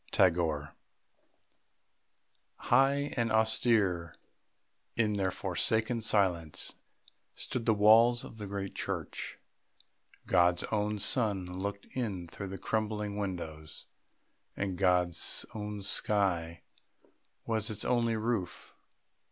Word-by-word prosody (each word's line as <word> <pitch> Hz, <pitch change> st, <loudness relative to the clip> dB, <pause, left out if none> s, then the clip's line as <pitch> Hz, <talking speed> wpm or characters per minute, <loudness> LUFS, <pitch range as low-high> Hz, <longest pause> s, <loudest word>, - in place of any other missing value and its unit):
TAGORE. 80 Hz, -5 st, +2 dB, 1.8 s
High 140 Hz, +3 st, +2 dB
and 115 Hz, -2 st, 0 dB
austere 110 Hz, -6 st, +2 dB, 0.8 s
in 105 Hz, -3 st, +1 dB
their 95 Hz, -1 st, +1 dB
forsaken 110 Hz, +5 st, 0 dB
silence 90 Hz, -7 st, 0 dB, 0.6 s
stood 120 Hz, -2 st, -4 dB
the 110 Hz, -, +4 dB
walls 115 Hz, +4 st, +6 dB
of 110 Hz, -, -10 dB
the 105 Hz, -, -5 dB
great 100 Hz, -1 st, -4 dB
church -, -, -4 dB, 0.9 s
God's 90 Hz, -1 st, +3 dB
own 105 Hz, 0 st, 0 dB
sun 100 Hz, -3 st, +1 dB
looked 100 Hz, +3 st, -5 dB
in 100 Hz, -9 st, -3 dB
through 100 Hz, +3 st, -7 dB
the 95 Hz, +1 st, -6 dB
crumbling 105 Hz, 0 st, -2 dB
windows, 80 Hz, -6 st, -5 dB, 0.7 s
and 100 Hz, -2 st, -2 dB
God's 90 Hz, -2 st, +2 dB
own 105 Hz, -1 st, -5 dB
sky 90 Hz, -6 st, 0 dB, 0.8 s
was 110 Hz, -2 st, 0 dB
its 105 Hz, -1 st, -2 dB
only 115 Hz, -2 st, +2 dB
roof. 110 Hz, -5 st, -3 dB
100 Hz, 100 wpm, -31 LUFS, 90-110 Hz, 1.8 s, walls